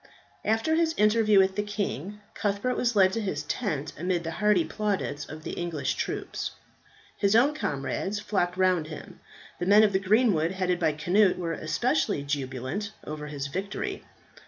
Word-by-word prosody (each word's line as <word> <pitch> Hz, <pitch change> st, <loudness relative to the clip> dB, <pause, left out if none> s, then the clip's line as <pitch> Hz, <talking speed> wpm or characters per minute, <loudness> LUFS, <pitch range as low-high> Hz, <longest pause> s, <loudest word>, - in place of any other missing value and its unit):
After 225 Hz, +8 st, +1 dB
his 325 Hz, 0 st, +2 dB
interview 215 Hz, 0 st, +4 dB
with 190 Hz, 0 st, +4 dB
the 205 Hz, -, +1 dB
king, 205 Hz, -, -4 dB
Cuthbert 205 Hz, +5 st, -1 dB
was 240 Hz, -2 st, 0 dB
led 190 Hz, -2 st, +5 dB
to 225 Hz, -, -1 dB
his 200 Hz, -3 st, -2 dB
tent 155 Hz, -, -3 dB
amid 175 Hz, 0 st, 0 dB
the 165 Hz, -, -3 dB
hearty 210 Hz, -5 st, +4 dB
plaudits 190 Hz, -5 st, -2 dB
of 155 Hz, +1 st, -9 dB
the -, -, -5 dB
English 160 Hz, -6 st, -2 dB
troops. -, -, -3 dB, 0.7 s
His 200 Hz, +1 st, +2 dB
own 270 Hz, +6 st, +5 dB
comrades 190 Hz, -, -2 dB
flocked 190 Hz, -4 st, -1 dB
round 185 Hz, -4 st, +2 dB
him; 155 Hz, -1 st, -10 dB, 0.4 s
the 175 Hz, -, -2 dB
men 205 Hz, +2 st, +7 dB
of 205 Hz, -2 st, +3 dB
the 190 Hz, -, +3 dB
greenwood 195 Hz, -4 st, +2 dB
headed 180 Hz, -2 st, 0 dB
by 160 Hz, -3 st, +2 dB
Cnut, 185 Hz, +5 st, +3 dB
were 170 Hz, -2 st, -2 dB
especially 180 Hz, -, 0 dB
jubilant 140 Hz, -, -3 dB
over 150 Hz, 0 st, -6 dB
his 145 Hz, -2 st, -4 dB
victory. 190 Hz, +7 st, -4 dB
190 Hz, 165 wpm, -27 LUFS, 155-210 Hz, 0.7 s, men